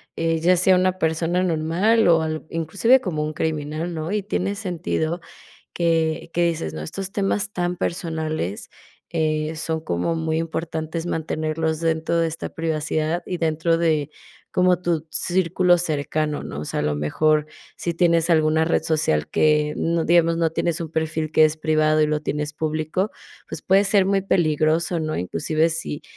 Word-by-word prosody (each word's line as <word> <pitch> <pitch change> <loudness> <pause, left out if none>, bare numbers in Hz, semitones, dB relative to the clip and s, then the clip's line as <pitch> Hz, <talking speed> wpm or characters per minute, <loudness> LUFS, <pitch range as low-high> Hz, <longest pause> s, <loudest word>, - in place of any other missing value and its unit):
"Eh, 165 0 0
ya 180 +3 +4
sea 185 +1 +4
una 185 0 +1
persona 165 +3 0
normal 175 +7 +2
o 165 -1 +5
al 155 0 -3
inclusive 195 - +3
como 155 -7 -2
un 155 - -3
criminal", 155 +2 -3
¿no? 160 +2 -4
Y 210 0 0
tiene 200 -1 -1
sentido 175 -3 -2 0.6
que 165 -1 0
que 175 0 +2
dices, 155 - -2
¿no? 80 - -5
Estos 195 - -6
temas 200 0 -1
tan 175 0 -1
personales, 160 - -3 0.4
eh, 155 -1 -1
son 160 0 -2
como 90 - -1
muy 160 0 -1
importantes 165 0 -3
mantenerlos 160 0 -2
dentro 165 0 0
de 165 - +2
esta 160 - -5
privacidad 160 +1 -1
y 180 - -3
dentro 165 +1 +1
de 155 -3 +1 0.4
como 180 -1 +3
tu 165 -2 -1
círculo 180 0 +2
cercano, 150 -2 -1
¿no? 70 - -6
O - - -5
sea, - - -3
a - - -1
lo 75 0 0
mejor 150 - +1 0.3
si 170 -1 -3
tienes 170 -1 +2
alguna 160 0 +3
red 165 - +1
social 115 - 0
que, 150 -1 +2
mm, 165 0 0
digamos, 165 0 +4
no 165 -1 +2
tienes 170 +1 -1
un 160 -2 -5
perfil 160 -1 -2
que 155 - +6
es 155 0 +1
privado 155 0 +2
y - - +4
lo 150 0 0
tienes 150 0 -3
público, 155 +6 -1 0.4
pues, - - -7
puede 195 +2 +4
ser 195 -1 +3
muy 195 0 +2
peligroso, 165 -1 +1
¿no? 155 0 -2
Inclusive 155 - 0
si 160 -2 -4
160 Hz, 170 wpm, -22 LUFS, 155-175 Hz, 0.6 s, que